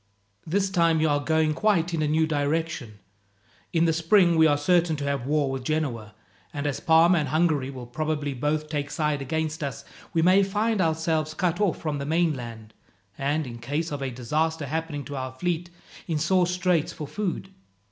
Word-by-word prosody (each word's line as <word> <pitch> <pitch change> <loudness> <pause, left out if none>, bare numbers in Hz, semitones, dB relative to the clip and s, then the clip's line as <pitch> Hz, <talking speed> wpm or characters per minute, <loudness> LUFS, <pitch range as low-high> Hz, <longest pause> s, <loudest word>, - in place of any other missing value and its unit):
This 190 +3 0
time 170 -3 +3
you 160 - +3
are 145 -1 +2
going 160 +1 +1
quite 175 -2 +1
in 160 - 0
a 150 - +1
new 160 +2 +2
direction. 150 -6 -2 0.7
In 170 -1 +2
the 165 - +3
spring 170 +2 +4
we 160 0 +6
are 145 -1 +3
certain 170 +1 +2
to 145 - -5
have 140 -3 -2
war 145 -2 +1
with 135 -1 -4
Genoa, 125 -8 -2 0.4
and 145 0 -4
as 145 -2 -1
Parma 170 0 +5
and 150 - -1
Hungary 155 -4 +1
will 130 -3 -8
probably 150 +2 -2
both 150 +4 -1
take 145 -2 -3
side 150 -2 -1
against 160 +3 -2
us, 140 -5 -5 0.3
we 165 - +1
may 185 +3 +6
find 210 +2 0
ourselves 160 -1 0
cut 180 +1 0
off 195 -6 +2
from 150 -3 -3
the 140 - -4
mainland, 125 -10 -1 0.4
and, 145 +5 -1
in 120 -2 -8
case 150 +7 -3
of 145 -1 -4
a 135 - -2
disaster 150 +6 -1
happening 155 0 -3
to 145 - -6
our 130 -1 -4
fleet, 175 +4 -2 0.4
in 160 - 0
sore 175 +3 +2
straits 180 -3 +1
for 155 - -6
food. 190 +3 -4
155 Hz, 190 wpm, -25 LUFS, 145-170 Hz, 0.7 s, we